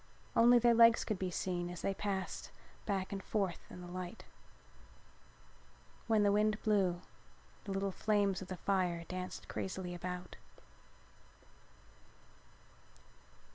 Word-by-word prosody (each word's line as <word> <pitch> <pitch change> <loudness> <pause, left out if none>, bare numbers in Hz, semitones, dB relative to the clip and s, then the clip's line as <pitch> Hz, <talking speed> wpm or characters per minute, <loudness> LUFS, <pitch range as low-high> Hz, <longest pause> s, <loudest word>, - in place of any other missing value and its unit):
Only 240 +1 +7
their 240 0 +5
legs 230 0 +7
could 210 -4 -2
be 185 - -1
seen 175 0 -2
as 180 - -7
they 195 - +1
passed 195 -1 -3 0.4
back 195 -2 -1
and 195 -1 -3
forth 195 -5 -1
in 180 - -9
the 175 - -8
light. 180 +3 -6 1.8
When 220 -2 +4
the 205 - +4
wind 215 +1 +2
blew 190 -5 +2 0.6
the 200 - -4
little 195 0 -1
flames 200 -1 +1
of 190 - -7
the 185 - -5
fire 180 -3 0
danced 185 0 -5
crazily 185 -2 -4
about. 180 0 -6
190 Hz, 125 wpm, -35 LUFS, 180-210 Hz, 1.8 s, Only